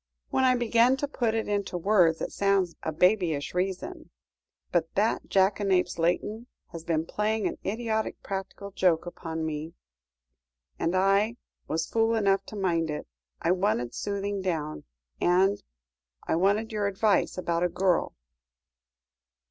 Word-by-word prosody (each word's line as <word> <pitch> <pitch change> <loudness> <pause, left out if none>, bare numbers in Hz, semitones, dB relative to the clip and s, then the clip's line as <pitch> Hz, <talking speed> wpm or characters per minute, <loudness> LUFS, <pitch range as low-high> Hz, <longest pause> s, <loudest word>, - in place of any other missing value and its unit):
"When 265 - +2
I 255 -1 +5
begin 240 +2 +3
to 285 - -2
put 235 -5 -1
it 225 - -1
into 200 -3 -1
words, 175 -3 +3
it - - -3
sounds 195 -3 +1
a 160 - -2
babyish 170 -4 +2
reason; 190 - -3 0.6
but 165 -2 +1
that 210 +3 +1
jackanapes, 190 -2 +2
Layton, 210 +7 0 0.2
has 165 -1 -7
been 165 -1 0
playing 215 +3 -1
an - - -2
idiotic 220 +1 -2
practical 195 +1 -5
joke 180 -4 +2
upon 165 -2 -5
me, 155 +1 -5 1.0
and 170 +3 0
I 195 +4 +3 0.3
was 165 +1 -1
fool 225 +3 +1
enough 195 -3 +2
to - - -8
mind 170 -5 0
it. 150 - -4 0.4
I 170 - +3
wanted 180 - 0
soothing 200 0 -3
down; 160 -5 -3 0.4
and 190 +3 +3 0.7
I - - +1
wanted 205 +6 +1
your 210 -2 0
advice 200 0 +1
about 170 -2 -1
a 180 - +2
girl." 180 0 +1
195 Hz, 140 wpm, -27 LUFS, 170-210 Hz, 1.0 s, I